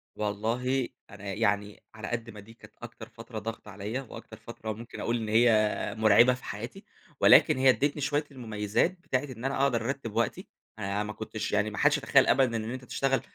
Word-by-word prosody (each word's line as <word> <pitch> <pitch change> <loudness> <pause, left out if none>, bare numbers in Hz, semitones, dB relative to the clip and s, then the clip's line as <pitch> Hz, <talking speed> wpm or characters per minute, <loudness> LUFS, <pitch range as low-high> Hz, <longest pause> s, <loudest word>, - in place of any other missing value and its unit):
والله 115 +5 -1 0.2
أنا 100 0 -7
يعني، 100 +1 -1
على 110 -1 -6
قد 115 -1 -4
ما 105 -2 -10
دي 110 +3 -13
كانت - - -17
أكتر - - -10
فترة 115 -1 -8
ضاغطة 110 -1 -7
عليَّ، 105 +6 -4
وأكتر 115 -3 -10
فترة 110 -1 -6
ممكن 115 +3 -10
أقول 120 +1 0
إن 110 -2 -4
هي 110 -1 +3
مُرعبة 110 +3 +6
في 125 - -10
حياتي، 115 - -7 0.4
ولكن - - +6
هي 130 0 +5
ادّتني 145 +3 +1
شوية 145 +2 0
المميِّزات 110 - -1
بتاعة 130 -7 -1
إن 130 -4 -8
أنا 135 0 0
أقدر 120 -5 +1
أرتّب 135 -4 -4
وقتي. - - -1 0.3
أنا 100 0 -1
ما 105 0 -5
كنتش 110 0 -5
يعني 105 +1 +1
ما 110 - -8
حدش 145 +1 +4
يتخيَّل 140 -1 +4
أبدًا 125 -3 +3
إن 110 +1 -4
أنت 130 0 -7
تشتغَل 135 +2 0
115 Hz, 195 wpm, -28 LUFS, 105-130 Hz, 0.4 s, مُرعبة